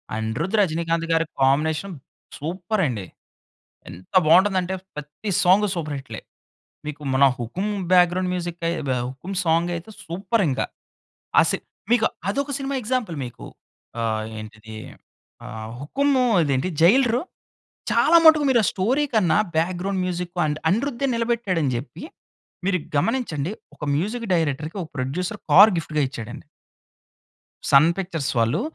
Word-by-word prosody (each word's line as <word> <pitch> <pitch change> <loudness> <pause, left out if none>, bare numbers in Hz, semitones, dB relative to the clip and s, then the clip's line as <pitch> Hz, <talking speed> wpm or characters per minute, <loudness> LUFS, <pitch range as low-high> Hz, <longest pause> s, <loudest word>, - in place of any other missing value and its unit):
అనిరుద్, 110 - -2
రజినీకాంత్ 165 -1 0
గారి 165 0 +2 0.2
combination 155 +7 +1 0.4
super 180 +7 -2
అండి. 105 -7 -4 0.8
ఎంత 90 +2 -13
బాగుంటుంది 190 +5 +5
అంటే 185 +1 -4 0.2
ప్రతి 150 +8 -7
సాంగ్ 190 +4 +5
సూపర్ 155 -4 -3
హిట్‌లే. 135 +1 -8 0.6
మీకు 150 0 -6
మన 135 +1 +4
'హుకుం' 170 - -3 0.2
బ్యాగ్రౌండ్ 180 0 +4
మ్యూజికే 175 -1 -3 0.2
వ - - -2 0.2
'హుకుం 135 +10 -7
సాంగ్' 165 +1 +2
అయితే 170 +5 -8 0.2
సూపర్ 195 +6 -1
ఇంక. 130 - -2 0.8
ఆ - - +8
సిన్ - - -2 0.3
మీకు 235 -2 +4 0.2
అదొక 280 +7 -2
సినిమా 275 0 -3
ఎగ్జాంపుల్ 235 -6 -2
మీకు. 120 - -10 0.6
ఆహ్, 110 -1 -1
ఏంటిది? 110 0 -10 0.7
ఆహ్, 110 -2 -7
'హుకుం' 275 - 0 0.3
ఇదేంటి 140 +3 0
'జైలరు' 240 - +4 0.7
చాలా 335 - +5
మటుకు 315 -2 +7
మీరు 245 -3 +4
ఆ - - +2
స్టోరీ 245 +10 +1
కన్నా, 205 -5 +3 0.2
బ్యాగ్రౌండ్ 185 +3 -1
మ్యూజిక్ 180 -1 -4
అండ్ 150 0 -1
అనిరుద్దే 250 +6 0
నిలబెట్టాడు 230 -6 0
అని 135 - +1
జెప్పి, 125 - -7 0.6
మీరు 190 -1 +2 0.2
గమనించండి 180 - -1 0.2
ఒక 145 - -11
మ్యూజిక్ 220 +9 -2
డైరెక్టర్‌కి, 160 +1 -1
ఒక 160 - -10
ప్రొడ్యూసర్ 175 +11 -3
కార్ 200 +4 +9
గిఫ్ట్‌గా 155 -2 -1
ఇచ్చాడండి. 130 +2 -8 1.2
'సన్ 145 +4 +6
పిక్చర్స్' 170 -7 -3
వాళ్ళు 115 - +1
170 Hz, 130 wpm, -23 LUFS, 145-205 Hz, 1.2 s, కార్